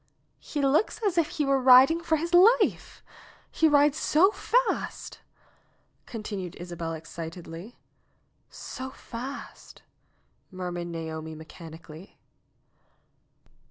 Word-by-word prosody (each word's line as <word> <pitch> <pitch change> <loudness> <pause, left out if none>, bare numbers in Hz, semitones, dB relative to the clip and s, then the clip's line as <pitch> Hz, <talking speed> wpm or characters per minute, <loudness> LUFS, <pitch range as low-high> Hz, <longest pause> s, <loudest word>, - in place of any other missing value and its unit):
"He 290 -2 -4
looks 285 +9 +2
as 390 -4 +1
if 335 -3 +2
he 310 -4 -2
were 275 -1 +2
riding 265 +6 +7
for 335 -1 +1
his 335 +3 -3
life! 400 +8 +3 0.5
He 320 - +3
rides 290 0 +3
so 365 +7 +4
fast - - -1 0.5
!" - - -42
continued 200 -5 -5
Isabel 170 -2 -6
excitedly. 165 +5 -9 0.7
"So 260 +1 -7
fast 255 +2 -9 0.4
!" - - -41 0.3
murmured 180 -2 -5
Naomi 160 -1 -6
mechanically. 160 +2 -12
235 Hz, 105 wpm, -27 LUFS, -, 0.7 s, riding